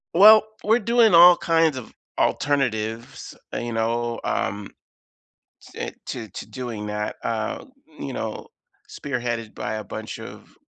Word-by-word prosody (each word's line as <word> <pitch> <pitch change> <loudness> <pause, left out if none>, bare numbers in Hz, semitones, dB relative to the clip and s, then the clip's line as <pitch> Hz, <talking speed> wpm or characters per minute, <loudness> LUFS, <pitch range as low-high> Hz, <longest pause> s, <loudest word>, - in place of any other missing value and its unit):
Well, 210 +4 +9 0.2
we're 220 +3 +4
doing 230 -1 +4
all 175 +1 +9
kinds 165 -4 +2
of 125 - -9 0.3
alternatives, 115 -5 -1 0.2
you 120 0 -4
know, 115 +1 -1
um, 100 0 -2 1.0
te - - -5 0.2
to 115 -4 -5
to - - -8
doing 120 -5 -6
that, 105 0 -3
uh, 110 -2 -3 0.3
you 135 - -5
know, 110 -3 -5 0.4
spearheaded 120 -5 -4
by 110 0 -4
a 110 - -5
bunch - - -7
of - - -11
120 Hz, 130 wpm, -23 LUFS, 110-165 Hz, 1.0 s, Well